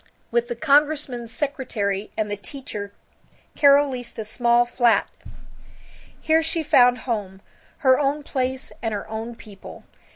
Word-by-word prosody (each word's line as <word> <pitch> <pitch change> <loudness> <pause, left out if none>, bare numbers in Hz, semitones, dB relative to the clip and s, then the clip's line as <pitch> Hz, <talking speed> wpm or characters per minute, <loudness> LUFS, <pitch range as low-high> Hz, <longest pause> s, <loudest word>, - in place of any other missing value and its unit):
With 235 0 +1
the 240 - -4
congressman's 280 -3 +1
secretary 220 -8 -2
and 215 -1 -1
the - - -1
teacher 205 -1 -7 0.6
Carol 285 0 +6
leased 245 -2 -7
a 220 - -4
small 240 +2 +2
flat. 240 -3 +2 1.1
Here 320 +1 +3
she 320 0 -1
found 250 -5 +4
home, 205 -6 -3 0.5
her 260 0 +6
own 290 +1 0
place 260 -1 -3
and 225 -2 -2
her 200 - -6
own 225 +2 -6
people. 205 -3 -12
240 Hz, 135 wpm, -23 LUFS, 220-280 Hz, 1.1 s, Carol